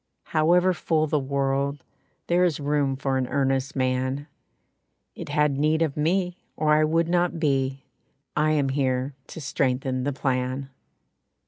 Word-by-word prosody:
However 175 +4 +4
full 155 -2 +1
the 150 0 +1
world 140 0 -1 0.4
There 175 +1 +2
is 170 -5 +1
room 145 -2 0
for 135 0 -1
an 130 -1 -1
earnest 135 0 0
man. 130 +2 0 0.9
It - - -8
had 150 -1 +1
need 155 +2 +2
of 155 -4 -2
me 180 +4 0 0.2
or 150 -1 +2
I 155 0 +4
would 165 +2 +2
not 175 -1 +1
be, 135 -3 0 0.5
I 155 +1 +2
am 145 -3 +1
here 130 0 0
to - - -9
strengthen 130 -2 -1
the 145 - 0
plan." 130 0 -2
140 Hz, 145 wpm, -25 LUFS, 135-155 Hz, 0.9 s, However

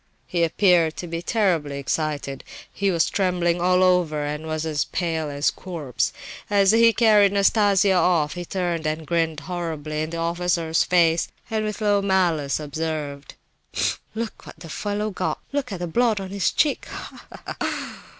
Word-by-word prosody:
He 170 -2 0
appeared 170 -1 +3
to - - -5
be 165 0 -4
terribly 175 -9 0
excited; 140 -1 -2 0.3
he 200 0 0
was 170 -3 +2
trembling 175 -3 0
all 180 +1 +4
over, 170 -5 +2
and 150 +2 -4
was 155 0 -2
as 155 -2 0
pale 160 -3 -2
as 145 +1 +1
a - - -3
corpse. 160 -9 -3 0.4
As 200 -1 +4
he 230 +1 +6
carried 215 -4 +5
Nastasia 200 -1 +4
off, 170 -4 +2
he 175 - -5
turned 175 -3 -2
and 155 +1 -3
grinned 165 -2 0
horribly 155 -2 -4
in 155 - -2
the 165 - -5
officer's 170 -1 +1
face, 170 -2 +3 0.2
and 220 -1 0
with 215 0 -4
low 205 -1 +3
malice 175 -8 +1
observed: 150 -1 -4 0.4
"Tfu! - - 0 0.2
look 225 0 -5
what - - -11
the 165 - -9
fellow 205 +8 -2
got! 185 -1 -2
Look 280 -5 -2
at 195 - -3
the 175 - -2
blood 220 +5 +1
on 190 -1 -6
his 200 -1 +1
cheek! 295 - +1
175 Hz, 165 wpm, -23 LUFS, 155-195 Hz, 0.4 s, he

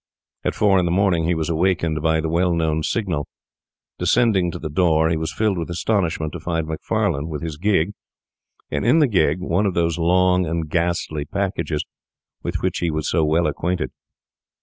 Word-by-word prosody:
At - - -1
four 100 -3 +4
in 90 - +1
the 85 - 0
morning 90 -3 +2
he 85 +1 +1
was 80 -1 -2
awakened 85 -2 0
by 80 0 +2
the 80 - -2
well 85 +2 +1
known 80 -1 0
signal. 85 -5 -1 0.7
Descending 110 -7 +3
to 85 - -5
the 85 - -5
door, 80 -1 +2
he 85 - +1
was 80 0 -3
filled 105 -5 0
with 85 - -4
astonishment 85 -3 -1
to 85 - -5
find 80 -1 -2
Macfarlane 80 -1 -1
with 75 +1 -5
his 80 -2 -4
gig, 95 0 +1 0.8
and 75 - -1
in 120 +8 +4
the 155 - +5
gig 90 - +1
one 95 +3 +1
of 95 - -2
those 85 -1 +1
long 90 +1 +3
and 80 0 -2
ghastly 85 -2 -1
packages 95 -5 -2 0.6
with - - -4
which - - 0
he 85 - 0
was 80 -1 -2
so 80 - +2
well 80 +3 +2
acquainted. 90 -1 -1
85 Hz, 190 wpm, -21 LUFS, 80-90 Hz, 0.8 s, the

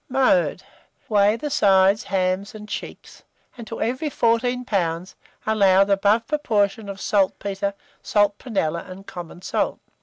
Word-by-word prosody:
Mode. 265 +1 +2 0.5
Weigh 205 0 +4
the 295 +5 -5
sides, 195 -2 +4
hams, 190 +3 -1
and 210 0 -9
cheeks, - - -8 0.3
and 235 -2 -10
to 225 - -6
every 255 +7 -2
14 245 0 +1
lbs. 180 -4 -1 0.3
allow 195 -3 +4
the 200 0 +1
above 205 +3 +2
proportion 215 -8 0
of 195 -1 -7
saltpetre, 200 0 0 0.3
salt 205 -1 +1
prunella, 170 -9 -2
and 190 +2 -10
common 175 0 -9
salt. - - -1
205 Hz, 140 wpm, -23 LUFS, 195-230 Hz, 0.5 s, Weigh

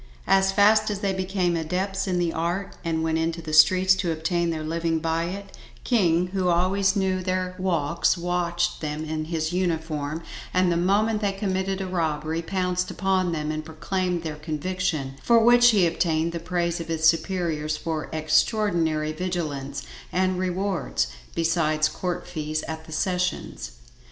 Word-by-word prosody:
As 195 0 +4
fast 215 +2 +4
as 205 -1 -3
they 195 -1 0
became 185 -2 0
adepts 190 +4 -2
in 180 -1 0
the 175 -2 0
art 175 +4 -2
and 160 -2 -1
went 160 0 +1
into 165 +1 -1
the 160 -2 -6
streets 185 +4 +6
to 175 -3 -1
obtain 170 +2 0
their 160 -2 -3
living 165 +1 -1
by 165 +1 -1
it, 195 +3 -7 0.3
King, 180 -7 +2
who 190 -1 -1
always 190 +3 +2
knew 190 -2 +1
their 185 0 -1
walks, 170 -3 +1
watched 175 0 -1
them 155 0 -3
in 155 0 -3
his 160 0 -2
uniform, 160 -3 -2 0.3
and 185 -1 +3
the - - +1
moment 210 +5 +2
they 200 -1 +1
committed 195 -1 -2
a - - -2
robbery, 160 -3 -1
pounced 180 0 -1
upon 190 -2 0
them 155 -2 -2
and 155 0 -3
procured 175 +2 -2
their 155 -2 -4
conviction, 155 -2 -3
for 235 - +4
which 240 +1 +6
he 205 -6 +4
obtained 165 -1 +1
the 170 - -4
praise 170 0 -1
of 165 - -6
his 160 -1 -1
superiors 165 -3 0
for 160 -1 -4
extraordinary 160 -1 +1
vigilance, 155 -6 -3 0.3
and 185 0 +1
rewards, 185 - -1 0.3
besides 160 -2 +2
court 180 +2 -4
fees 155 -3 -3
at 160 0 -6
the 160 - -12
sessions. 180 - -2
175 Hz, 160 wpm, -25 LUFS, 160-185 Hz, 0.3 s, streets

